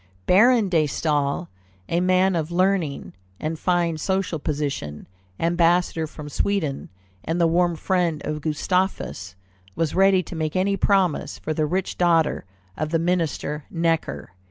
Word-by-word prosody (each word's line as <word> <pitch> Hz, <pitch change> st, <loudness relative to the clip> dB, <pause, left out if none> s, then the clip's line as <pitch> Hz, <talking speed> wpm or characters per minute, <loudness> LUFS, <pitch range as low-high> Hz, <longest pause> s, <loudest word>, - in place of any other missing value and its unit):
Baron 225 Hz, +3 st, +5 dB
de 165 Hz, -4 st, +2 dB
Staël, 150 Hz, +2 st, -1 dB, 0.4 s
a 170 Hz, -, 0 dB
man 185 Hz, +1 st, +3 dB
of 160 Hz, -1 st, -1 dB
learning 180 Hz, -4 st, 0 dB, 0.3 s
and 155 Hz, +1 st, -3 dB
fine 175 Hz, -3 st, +1 dB
social 190 Hz, -2 st, -1 dB
position, 140 Hz, -, -3 dB, 0.3 s
ambassador 170 Hz, -1 st, +2 dB
from 150 Hz, -1 st, -9 dB
Sweden, 155 Hz, -3 st, -1 dB, 0.3 s
and 165 Hz, +2 st, -2 dB
the 170 Hz, -, +4 dB
warm 170 Hz, +1 st, +2 dB
friend 170 Hz, -2 st, 0 dB
of 150 Hz, 0 st, -3 dB
Gustavus, 155 Hz, -, -2 dB, 0.4 s
was 160 Hz, -3 st, -1 dB
ready 190 Hz, -1 st, +4 dB
to 175 Hz, -, -9 dB
make 155 Hz, 0 st, -2 dB
any 195 Hz, +2 st, +2 dB
promises 195 Hz, -4 st, +1 dB
for 155 Hz, -, -3 dB
the 155 Hz, 0 st, 0 dB
rich 185 Hz, +4 st, -2 dB
daughter 165 Hz, -, +2 dB, 0.3 s
of 155 Hz, 0 st, -2 dB
the 165 Hz, -, +1 dB
Minister 165 Hz, -3 st, -1 dB
Necker. 165 Hz, -, -1 dB
170 Hz, 140 wpm, -23 LUFS, 155-185 Hz, 0.4 s, Baron